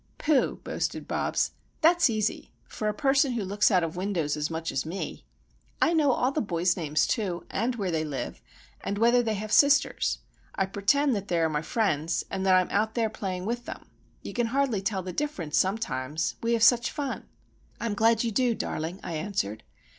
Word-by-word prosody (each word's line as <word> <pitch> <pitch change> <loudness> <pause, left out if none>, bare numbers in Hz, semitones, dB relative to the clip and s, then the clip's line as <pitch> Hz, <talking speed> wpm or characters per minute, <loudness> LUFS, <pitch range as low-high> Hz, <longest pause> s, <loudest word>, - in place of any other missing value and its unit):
"Pooh!" 300 -4 +1
boasted - - -3
Bobs, - - 0 0.3
"that's 345 -2 +5
easy;—for 215 0 -3
a - - +2
person 270 +4 +2
who 230 -3 -2
looks 205 +2 +3
out 185 -5 +3
of 165 0 -3
windows 180 -5 -1
as 150 0 -2
much 165 0 -3
as - - -1
me. 170 +5 -6 0.5
I 335 - +3
know 300 -4 +4
all 255 +1 +1
the 300 - -1
boys' 175 -3 +1
names, 155 -3 +1
too, 185 -7 -2
and 235 +5 0
where 195 -5 -2
they 160 -1 0
live, 145 -4 -5 0.4
and 200 - -2
whether 235 +3 +4
they 220 -2 -1
have 210 +1 -5
sisters. 285 +4 +4 0.4
I 195 - +1
pertend 230 +9 +2
that 200 -1 -4
they 175 - 0
are 165 -1 +2
my 150 -1 -1
friends, 165 -4 0
and 190 - -2
that 185 - +6
I'm 185 -1 +2
out 215 +2 +1
there 225 -3 +1
playing 185 -2 -4
with 240 +2 -3
them. - - -9 0.3
You - - -6
can 240 -2 0
hardly 255 -4 0
tell 195 -1 -2
the 185 0 -5
difference, 185 - -1
sometimes! 165 - -1
We 235 0 +1
have 230 -1 +2
such 235 0 +5
fun." 285 -3 -4 0.5
"I'm 230 -2 -2
glad 225 +2 +3
you 230 - -1
do, 245 +1 +2
darling," 165 +1 -4
I 170 - -5
answered. 155 - -2
205 Hz, 195 wpm, -27 LUFS, 175-235 Hz, 0.5 s, that